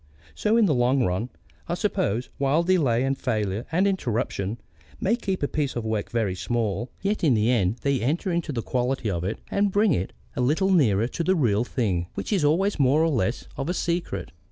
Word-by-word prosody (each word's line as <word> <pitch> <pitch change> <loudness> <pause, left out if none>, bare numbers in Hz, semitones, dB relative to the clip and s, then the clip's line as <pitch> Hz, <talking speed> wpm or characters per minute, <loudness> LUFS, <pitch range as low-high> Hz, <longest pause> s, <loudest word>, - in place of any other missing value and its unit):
So 215 +2 +1
in 230 - +5
the 165 - +3
long 125 +1 +2
run, 95 +6 -1 0.4
I - - 0
suppose, 115 +6 -1
while 140 +4 +2
delay 145 -10 +2
and 135 +1 +1
failure 110 -5 -2
and 180 +4 +2
interruption 115 - -1 0.4
may 205 +5 +2
keep 195 -8 -3
a - - +2
piece 145 -3 -2
of 120 -2 -3
work 110 -2 -2
very 110 -5 0
small, 115 +3 -2
yet 205 0 -1
in 140 -7 +4
the 110 +3 +2
end 105 -4 +2
they 140 -3 +1
enter 160 - 0
into 170 -3 -1
the 115 -5 -3
quality 125 -3 -1
of 85 -2 -2
it 100 +4 -2
and 200 0 +2
bring 205 -2 +3
it 95 -7 -2 0.2
a - - -1
little 160 +10 +2
nearer 115 - +3
to 165 - -3
the 185 +3 +2
real 115 - +2
thing, 95 -9 -1
which - - -3
is 190 -6 +2
always 175 +6 +2
more 140 +3 +4
or 165 - +3
less 120 -4 -1
of 135 +3 -3
a 180 - 0
secret. 170 - -2
130 Hz, 210 wpm, -25 LUFS, 110-170 Hz, 0.4 s, in